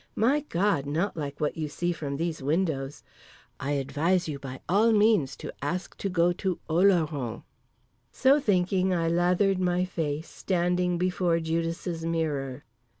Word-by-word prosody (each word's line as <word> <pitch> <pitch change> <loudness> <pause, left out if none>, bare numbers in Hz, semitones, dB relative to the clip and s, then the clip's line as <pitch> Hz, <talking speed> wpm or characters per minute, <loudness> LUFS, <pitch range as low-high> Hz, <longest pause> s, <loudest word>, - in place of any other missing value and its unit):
My 260 +7 +3
God—not 175 - 0
like 145 -3 -5
what 150 - -1
you 155 -1 -2
see 175 +4 -1
from 145 -4 -4
these 165 -1 -2
windows. 145 -2 -1 0.6
I 140 +2 -2
advise 165 +6 0
you 145 -3 -4
by 130 -1 -7
all 210 +7 +4
means 210 -10 +3
to - - -8
ask 175 +6 -3
to 200 - -2
go 175 -1 +2
to 185 0 -2
Oloron." 160 - +1 0.7
So 270 +3 +4
thinking 185 -4 +1
I 165 -1 0
lathered 180 +3 +2
my 180 0 +1
face, 160 -3 -3
standing 180 -1 0
before 180 -1 +1
Judas' 165 +1 -2
mirror. 145 -5 -2
170 Hz, 145 wpm, -27 LUFS, 150-185 Hz, 0.7 s, all